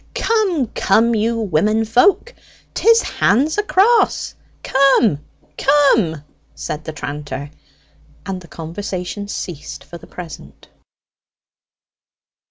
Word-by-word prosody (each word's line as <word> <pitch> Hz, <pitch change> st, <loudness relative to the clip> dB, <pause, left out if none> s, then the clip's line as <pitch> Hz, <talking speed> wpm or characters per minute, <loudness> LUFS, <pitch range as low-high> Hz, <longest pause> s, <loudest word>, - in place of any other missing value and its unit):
"Come, 400 Hz, -, +1 dB
come, 230 Hz, +4 st, +2 dB
you 230 Hz, +1 st, 0 dB
women 215 Hz, +2 st, +1 dB
folk; 250 Hz, -, +2 dB, 0.4 s
'tis 460 Hz, 0 st, +4 dB
hands 285 Hz, -, +1 dB
across 415 Hz, +3 st, +2 dB, 0.3 s
come, 260 Hz, -, +3 dB, 0.4 s
come!" 225 Hz, -, +3 dB, 0.3 s
said 155 Hz, +1 st, -6 dB
the 160 Hz, -, -4 dB
tranter; 145 Hz, -1 st, -6 dB, 0.7 s
and 190 Hz, -2 st, -5 dB
the 170 Hz, -, -14 dB
conversation 180 Hz, +4 st, -6 dB
ceased 175 Hz, -6 st, -7 dB
for 170 Hz, -, -11 dB
the -, -, -15 dB
present. 160 Hz, -, -11 dB
210 Hz, 95 wpm, -18 LUFS, 165-275 Hz, 0.7 s, tis